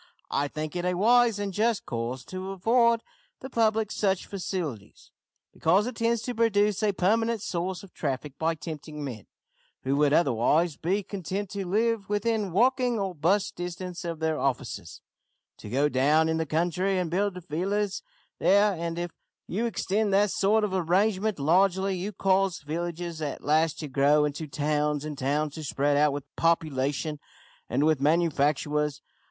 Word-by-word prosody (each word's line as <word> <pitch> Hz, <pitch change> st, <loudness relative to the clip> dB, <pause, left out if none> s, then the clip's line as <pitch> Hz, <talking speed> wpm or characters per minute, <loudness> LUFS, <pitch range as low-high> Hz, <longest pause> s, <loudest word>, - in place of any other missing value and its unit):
I 145 Hz, -, +1 dB
think 155 Hz, +2 st, -5 dB
it 175 Hz, -, -2 dB
a 180 Hz, 0 st, 0 dB
wise 235 Hz, +3 st, +4 dB
and 200 Hz, -1 st, -3 dB
just 220 Hz, +2 st, +1 dB
course 120 Hz, +1 st, -4 dB
to 185 Hz, +1 st, -6 dB
afford 230 Hz, +4 st, +3 dB, 0.4 s
the 265 Hz, -, -8 dB
public 220 Hz, -2 st, +1 dB
such 195 Hz, -3 st, 0 dB
facilities, 165 Hz, -, -5 dB, 0.4 s
because 190 Hz, +6 st, +3 dB
it 250 Hz, -1 st, -4 dB
tends 230 Hz, 0 st, 0 dB
to 245 Hz, -, -3 dB
produce 210 Hz, -3 st, +2 dB
a 210 Hz, -1 st, +3 dB
permanent 220 Hz, +4 st, +1 dB
source 180 Hz, +2 st, -3 dB
of 195 Hz, -, -14 dB
traffic 140 Hz, -1 st, -3 dB
by 165 Hz, +1 st, +1 dB
tempting 150 Hz, -1 st, -7 dB
men, 120 Hz, -7 st, -7 dB, 0.6 s
who 135 Hz, +1 st, 0 dB
would 145 Hz, -1 st, +3 dB
otherwise 150 Hz, +3 st, +2 dB
be 190 Hz, +7 st, -1 dB
content 195 Hz, 0 st, -4 dB
to 195 Hz, -2 st, -4 dB
live 220 Hz, +1 st, 0 dB
within 210 Hz, -1 st, 0 dB
walking 245 Hz, +4 st, +2 dB
or 195 Hz, -3 st, -2 dB
'bus 185 Hz, +5 st, +1 dB
distance 175 Hz, +1 st, -6 dB
of 170 Hz, -1 st, -4 dB
their 160 Hz, 0 st, -1 dB
offices, 125 Hz, -10 st, -3 dB, 0.6 s
to 105 Hz, -, -10 dB
go 140 Hz, +6 st, +2 dB
down 150 Hz, +4 st, +3 dB
into 160 Hz, 0 st, 0 dB
the -, -, -20 dB
country 175 Hz, +5 st, 0 dB
and 180 Hz, -3 st, -1 dB
build 195 Hz, +1 st, 0 dB
villas 195 Hz, +6 st, -1 dB, 0.4 s
there, 200 Hz, +2 st, +4 dB
and 170 Hz, -1 st, -4 dB
if 175 Hz, 0 st, -3 dB, 0.3 s
you 225 Hz, +6 st, -1 dB
extend 210 Hz, -1 st, 0 dB
that 200 Hz, +1 st, +3 dB
sort 215 Hz, +3 st, +2 dB
of 205 Hz, -3 st, -1 dB
arrangement 190 Hz, +3 st, +1 dB
largely, 190 Hz, +5 st, +2 dB
you 185 Hz, +3 st, -4 dB
cause 195 Hz, -3 st, +1 dB
villages 170 Hz, +1 st, -4 dB
at 145 Hz, -2 st, -4 dB
last 155 Hz, +2 st, +2 dB
to 155 Hz, -, -5 dB
grow 145 Hz, +2 st, +3 dB
into 150 Hz, +2 st, -4 dB
towns, 150 Hz, 0 st, -1 dB
and 155 Hz, -1 st, -5 dB
towns 145 Hz, +2 st, 0 dB
to 160 Hz, -, -7 dB
spread 145 Hz, 0 st, +1 dB
out 150 Hz, +1 st, +4 dB
with 145 Hz, 0 st, -4 dB
population 150 Hz, -2 st, 0 dB, 0.5 s
and 145 Hz, -, +1 dB
with 155 Hz, -3 st, +2 dB
manufactures. 150 Hz, -2 st, +1 dB
175 Hz, 165 wpm, -27 LUFS, 150-200 Hz, 0.6 s, wise